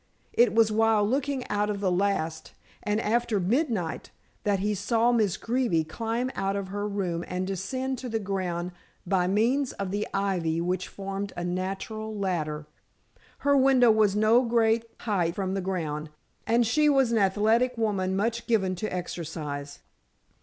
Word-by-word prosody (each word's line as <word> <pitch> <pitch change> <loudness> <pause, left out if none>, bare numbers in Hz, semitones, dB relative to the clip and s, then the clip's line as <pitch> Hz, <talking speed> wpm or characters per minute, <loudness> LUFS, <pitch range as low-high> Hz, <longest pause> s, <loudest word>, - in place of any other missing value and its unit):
It 235 -2 +4
was 225 -1 +5
while 220 -1 +3
looking 270 +1 -1
out 205 0 0
of 205 -1 -2
the 195 -2 +1
last, 175 -4 -1 0.3
and 210 +1 0
after 230 -1 +1
midnight, 205 - -1 0.4
that 205 -1 +2
he 205 +2 0
saw 225 +4 +2
Miss 215 -6 +2
Greeby 230 -9 +1
climb 230 +9 -2
out 195 0 -1
of 200 -1 -3
her 205 +1 -3
room 185 -4 -2
and 180 +1 -2
descend 255 +8 -3
to 255 - -5
the 225 - 0
ground 185 -4 -3 0.3
by 180 -1 +1
means 240 +8 +1
of 195 -2 -4
the 205 +1 -1
ivy 180 -5 0
which 180 +1 -1
formed 195 0 -5
a 175 - -3
natural 195 +5 -3
ladder. 155 -6 -2 0.8
Her 285 0 +5
window 260 -3 +5
was 215 -2 +3
no 215 +3 +5
great 230 -1 +2 0.2
height 180 -6 0
from 190 -1 -2
the 195 - -1
ground, 160 -5 -3 0.4
and 235 +1 +3
she 300 +6 +3
was 270 -4 +3
an 230 - +3
athletic 220 +5 +2
woman 195 -4 0
much 230 +4 -1
given 200 -6 +2
to 215 - -3
exercise. 150 -5 -5
205 Hz, 160 wpm, -27 LUFS, 185-230 Hz, 0.8 s, was